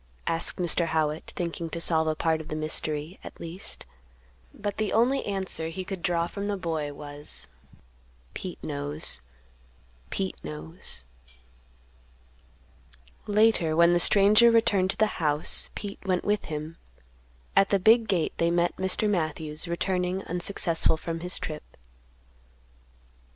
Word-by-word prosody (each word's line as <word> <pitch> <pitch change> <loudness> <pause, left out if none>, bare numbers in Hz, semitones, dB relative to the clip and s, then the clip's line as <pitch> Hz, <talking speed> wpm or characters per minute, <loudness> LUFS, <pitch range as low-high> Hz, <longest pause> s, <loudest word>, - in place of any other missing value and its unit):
asked 165 0 +1
Mr. 175 -1 +2
Howitt, 155 -1 -1
thinking 170 -1 -3
to 170 - -4
solve 160 -1 +2
a 155 - +1
part 160 0 0
of 155 - -12
the - - -4
mystery, 155 +2 -2
at - - -10
least. 170 +3 -7 0.7
But 205 -1 -5
the 215 -2 -1
only 245 +5 +3
answer 190 -5 0
he 185 +3 -5
could 190 -1 -6
draw 170 -1 +1
from 200 +3 -5
the 205 -1 -1
boy 160 -5 -3
was, 145 - -4 0.9
"Pete 180 -2 -6
knows; 145 - -2 0.9
Pete 190 -1 -3
knows." 75 -4 -5 2.2
Later 210 -6 +3
when 170 +1 +5
the 175 - +3
stranger 210 +6 +6
returned 205 -5 +3
to - - -1
the 215 -4 0
house, 150 -1 +5
Pete 205 -1 -6
went 185 -2 -1
with 210 0 0
him; 155 +2 -6 0.8
at 195 0 +5
the 200 - +3
big 220 +4 +5
gate 180 -5 0
they 170 - +2
met 175 0 +1
Mr. 190 +3 +1
Matthews, 155 -4 -2
returning 180 +2 -1
unsuccessful 175 -2 +1
from 165 +1 -5
his 180 +2 -1
trip. 155 -1 -5
170 Hz, 135 wpm, -27 LUFS, 155-195 Hz, 2.2 s, stranger